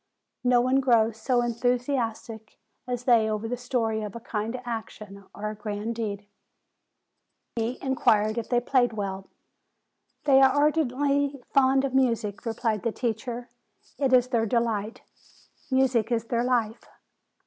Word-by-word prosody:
No 245 -1 +4
one 255 +2 +2
grows 230 -4 +2
so 245 +1 +2
enthusiastic 240 -2 -2 0.3
as 245 -1 -3
they 230 -3 +4
over 215 +1 -2
the 245 - -2
story 235 -3 -1
of 210 -1 -6
a - - -5
kind 225 +2 -4
action, 215 -4 -7
of 205 - -10
a 215 0 -2
grand 210 +1 -4
deed." 205 -3 -4 1.3
Votini 230 +2 -2
inquired 220 -4 +2
if 230 - -7
they 245 - +3
played 245 -1 +2
well. 195 -2 -5 0.9
"They 270 -2 +5
are 270 - +7
ardently 285 -1 +1
fond 270 0 +4
of 265 - -3
music," 230 -5 0
replied 225 -2 -1
the 230 - -1
teacher. 240 +1 -4 0.5
"It 270 -2 +1
is 250 -1 +4
their 230 -3 +1
delight. 225 -1 -1 0.7
Music 260 -4 +2
is 230 -2 +1
their 235 0 0
life. 235 -3 0
235 Hz, 140 wpm, -26 LUFS, 220-255 Hz, 1.3 s, are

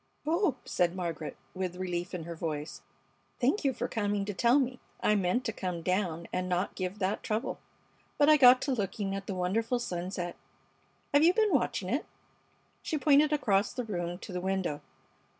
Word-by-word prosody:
"Oh!" 330 - +2
said 175 -1 +1
Margaret, 165 -4 -4 0.2
with 185 -1 -3
relief 180 -1 -3
in 170 - -4
her 170 +1 -6
voice. 150 -4 -4 0.6
"Thank 275 +12 +2
you 275 - +3
for - - -3
coming 205 -2 -1
to 205 - -3
tell 235 +7 +4
me. 255 -2 0 0.2
I 210 - +3
meant 205 +5 +1
to 225 - -1
come 180 -4 -4
down 175 -2 -1
and 185 0 -1
not 180 +2 0
give 185 +1 -4
that 200 +1 -1
trouble, 215 +1 -2 0.6
but 290 - +5
I 305 - +8
got 255 -3 +7
to 275 - -1
looking 200 -3 -2
at 195 0 -5
the 195 - -3
wonderful 220 +7 0
sunset. 180 -4 -4 0.8
Have 285 +1 +6
you 345 +2 +5
been 435 -3 +3
watching - - +1
it?" - - -1 0.7
She 310 - -2
pointed 295 +1 +5
across 205 -9 +2
the 250 - -3
room 175 -5 -3
to 190 - -9
the 180 - -2
window. 190 -5 -1
195 Hz, 185 wpm, -30 LUFS, 180-250 Hz, 0.8 s, I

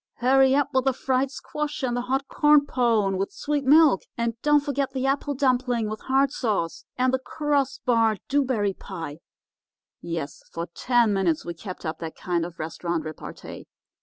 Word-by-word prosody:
'Hurry 265 +2 +4
up 285 -1 +2
with 260 0 +2
the 270 - +3
fried 260 +1 0
squash, 300 +1 -5
and 245 -2 0
the 245 - 0
hot 265 +2 -1
corn 295 -1 +4
pone 225 -8 +1
with 195 - -2
sweet 295 -1 -2
milk, 295 - +6 0.2
and 235 0 0
don't 295 0 +4
forget 280 -2 -2
the 260 -1 -2
apple 280 +1 0
dumpling 250 -4 +1
with 215 - -6
hard 270 0 +2
sauce, 205 - -2
and 255 +1 +2
the 260 - +2
cross 285 -1 -1
barred 225 -4 +2
dew 285 +1 +2
berry 215 -7 0
pie—' 165 -6 -8 0.8
"Yes, 165 -4 -5
for 165 0 -4
ten 240 -2 +2
minutes 180 -5 0
we 170 - -4
kept 180 +1 -9
up 160 0 -3
that 165 -1 -6
kind 175 -2 -1
of 175 - -14
restaurant 165 0 -3
repartee. 155 -1 -9
250 Hz, 180 wpm, -25 LUFS, 190-275 Hz, 0.8 s, milk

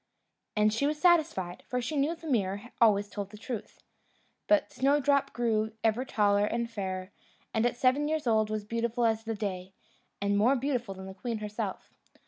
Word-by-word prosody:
And 210 0 +3
she 280 +6 +1
was 300 +1 -1
satisfied, 310 - +2
for 250 - -1
she 250 +6 -3
knew 290 +4 +1
the 330 - -14
mirror 210 -4 -1
always 205 -3 +5
told 200 -1 -5
the 210 - -11
truth. 230 0 -7 0.6
But 310 -1 +3
Snowdrop 280 +2 +2
grew 220 -2 0
ever 225 +3 +2
taller 205 -3 +2
and 235 +1 -1
fairer, 190 -4 -4 0.4
and 225 +1 +3
at 240 - -3
seven 265 +4 +3
years 310 -1 -1
old 220 -2 +3
was 215 -1 -3
beautiful 230 +2 0
as 225 -1 +1
the 225 0 -2
day, 190 -3 -4 0.5
and 200 0 +1
more 245 +6 +4
beautiful 250 -6 -2
than 190 0 -9
the 190 - -8
queen 225 +4 -4
herself. 210 0 -5
225 Hz, 180 wpm, -29 LUFS, 205-255 Hz, 0.6 s, always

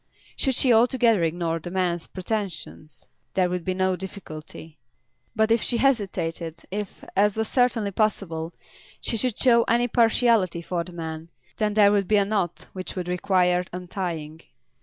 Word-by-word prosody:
Should 265 -3 0
she 250 -1 +4
altogether 230 -3 +4
ignore 165 0 -1
the 175 - -7
man's 175 -2 -1
pretensions, 185 -6 -5 0.3
there 180 -2 +2
would 180 -1 -2
be 185 0 -2
no 185 0 +1
difficulty. 160 -4 -9 0.6
But 220 0 +2
if 230 -1 +4
she 240 - 0
hesitated, 185 - 0
if, 205 0 -5
as 205 +2 +3
was 220 0 0
certainly 235 -5 +1
possible, 180 -6 -1 0.5
she - - -1
should 240 0 0
show 235 -2 +5
any 240 +1 +2
partiality 225 -7 +2
for 170 0 -2
the 180 - -10
man, 160 -1 -6 0.3
then 210 -1 0
there 205 -2 +6
would 200 -2 +1
be 210 - +4
a 200 - +3
knot 195 -5 -2
which 185 -1 -6
would 180 -2 -4
require 180 0 +2
untying. 170 -4 -5
190 Hz, 160 wpm, -25 LUFS, 170-220 Hz, 0.6 s, there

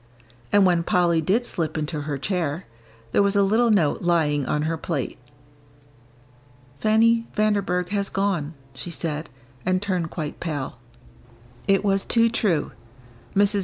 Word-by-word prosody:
And 205 -1 +5
when 175 -2 +3
Polly 170 -1 +2
did 210 +10 +1
slip 165 -8 -3
into 150 0 -2
her 145 -1 -3
chair, 170 +1 -2 0.5
there - - +4
was 200 0 +2
a 200 - +5
little 225 +4 +3
note 180 -9 +2
lying 155 -5 +1
on 150 - 0
her 165 +1 0
plate. 155 -6 -3 1.6
"Fanny 230 +3 +3
Vanderburgh 200 -4 +1
has 200 -1 -1
gone," 180 -6 -1 0.2
she 135 +6 -7
said, 155 -2 -4 0.3
and 185 0 +1
turned 185 -4 -1
quite 155 -3 -5
pale. 145 -7 -4 0.9
It 195 +1 +3
was 195 -1 +2
too 230 -1 +3
true. 200 -8 0 0.6
Mrs. 205 +1 +4
180 Hz, 140 wpm, -24 LUFS, 155-200 Hz, 1.6 s, And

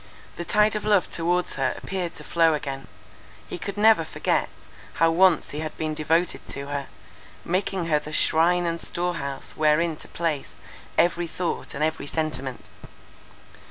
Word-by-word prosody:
The 175 - -5
tide 210 +3 +3
of 210 - -2
love 205 -4 +3
towards 175 +2 +1
her - - +1
appeared 185 -3 -4
to - - -7
flow 165 -2 +3
again; 135 -2 -5 0.6
he - - -6
could 200 +4 -5
never 220 +1 +6
forget, - - 0 0.5
how 165 0 +4
once 175 -1 +4
he 150 - -4
had 155 -1 -5
been 155 -1 -2
devoted 160 +3 0
to 140 0 -6
her, 140 -1 -3 0.6
making 185 0 0
her 155 -2 +2
the 150 +1 -9
shrine 175 +3 +3
and 170 0 -2
storehouse 170 -6 -3
wherein 155 +2 +3
to - - -10
place 165 -4 -3 0.4
every 175 0 +3
thought 170 +1 -3
and 145 - -1
every 155 -2 -1
sentiment. 135 -5 -3
165 Hz, 160 wpm, -25 LUFS, 150-180 Hz, 0.6 s, never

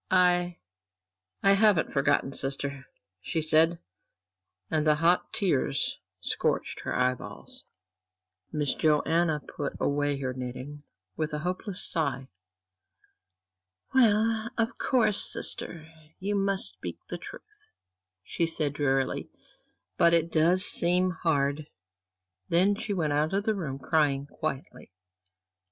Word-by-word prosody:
"I 180 -1 +3 0.9
I 195 - +5
haven't 200 -4 +3
forgotten, 140 -1 +1
sister," 135 0 -4 0.3
she 165 - -2
said, 160 +2 +4 0.9
and 155 -1 +1
the 150 - +5
hot 170 +4 +2
tears 145 -7 0 0.2
scorched - - -1
her - - -4
eyeballs. 125 0 -3 0.9
Miss 150 -3 0
Joanna 155 +1 +1
put 145 0 -5
away 145 0 0
her 130 -2 -3
knitting 130 +3 -7 0.3
with 155 +4 -3
a - - -1
hopeless 185 +1 -1
sigh. 135 -5 -2 1.6
"Well, 225 -2 +3
of 225 0 0
course, 230 -6 +2
sister, 160 -2 -1 0.3
you 200 +2 -2
must 195 - 0
speak 90 -2 -7
the - - -6
truth," - - -13 0.5
she 170 - -1
said, 155 -3 -2
drearily, 135 -2 -1 0.7
"but 170 0 +5
it 165 0 0
does 175 +5 +4
seem 180 +2 +4
hard." 145 -3 -1 0.8
Then 185 +4 +3
she 205 +1 -5
went 160 -7 0
out 155 +5 +1
of 200 - 0
the 220 - +1
room, 155 -10 -4
crying 140 0 +1
quietly. 145 - -6
160 Hz, 115 wpm, -28 LUFS, 140-185 Hz, 1.6 s, I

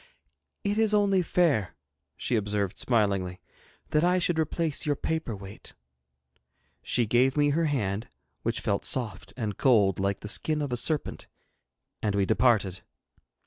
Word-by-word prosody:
'It 205 +2 0
is 215 -1 +4
only 200 -2 +3
fair,' 160 - +1 0.4
she 125 - -1
observed, 100 -2 -1
smilingly, 100 -6 0 0.5
'that 155 +1 +3
I 180 +1 +3
should 175 -2 +1
replace 160 -1 -1
your 145 -1 +1
paper 160 -6 -3
weight.' 100 0 -10 1.1
She 120 - +1
gave 125 +5 +2
me 145 0 +4
her 165 +3 +1
hand, 110 -7 -1 0.3
which - - -2
felt - - -1
soft 105 -6 -1
and 105 -5 -4
cold, 105 -8 +4
like 100 0 -1
the - - -6
skin 155 +8 0
of 140 - -4
a - - +1
serpent, 150 +5 -1 0.7
and 105 -2 0
we 100 -1 +2
departed. 105 -5 +2
120 Hz, 145 wpm, -27 LUFS, 100-155 Hz, 1.1 s, is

